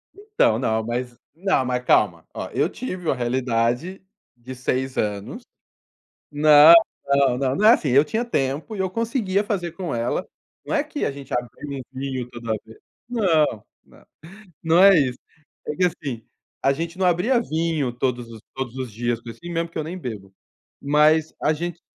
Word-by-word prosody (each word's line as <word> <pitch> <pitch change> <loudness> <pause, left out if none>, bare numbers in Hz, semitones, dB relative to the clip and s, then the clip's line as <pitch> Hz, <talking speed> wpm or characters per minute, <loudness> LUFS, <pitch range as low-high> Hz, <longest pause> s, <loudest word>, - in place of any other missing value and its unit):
Então, 425 +4 +1
não, 110 0 0
mas 120 +2 -4 0.2
não, 185 -5 +1
mas 125 0 -1
calma, - - +2
ó, - - -5
eu - - +1
tive 185 -9 -6
uma 140 - +2
realidade 125 +6 -1 0.3
de 125 +2 -10
6 130 +1 -2
anos 105 -1 -3 0.9
não, 150 +2 +8 0.3
não, 140 -3 +3
não, 135 -1 0
não 205 - 0
é - - +9
assim, 155 - -2
eu 140 +4 +5
tinha 220 +10 -2
tempo 145 - -2
e - - -7
eu 190 -1 0
conseguia 215 -2 -1
fazer 185 -5 -3
com 175 -4 -4
ela. 115 +1 -2 0.4
Não - - -2
é 295 - +2
que 300 -1 -4
a - - -1
gente 140 0 -11
abria 135 +3 -4
um - - -7 0.2
vinho 130 -2 -4
toda 120 -2 -5
vez. 110 - -15 0.3
Não, 165 - +1 0.2
não, - - -21 0.6
não 165 +2 +4
é 195 -3 +8
isso. 130 -4 0 0.5
É 150 - -3
que, 180 - +1
assim, 145 -9 -3 0.4
a 135 - +3
gente 165 +4 -5
não 190 - +2
abria 180 +9 +2
vinho 160 - -1
todos 125 -1 -2
os 115 -1 -11
todos 130 -2 -5
os 130 -4 -5
dias, 120 +2 -2
assim, 170 +9 -9
mesmo 170 0 -2
que 165 - -6
eu - - -1
nem 175 +4 -6
bebo. 105 - -7 0.5
Mas 150 +2 +3
a 155 - +3
gente 175 +2 -5
145 Hz, 180 wpm, -23 LUFS, 125-180 Hz, 0.9 s, é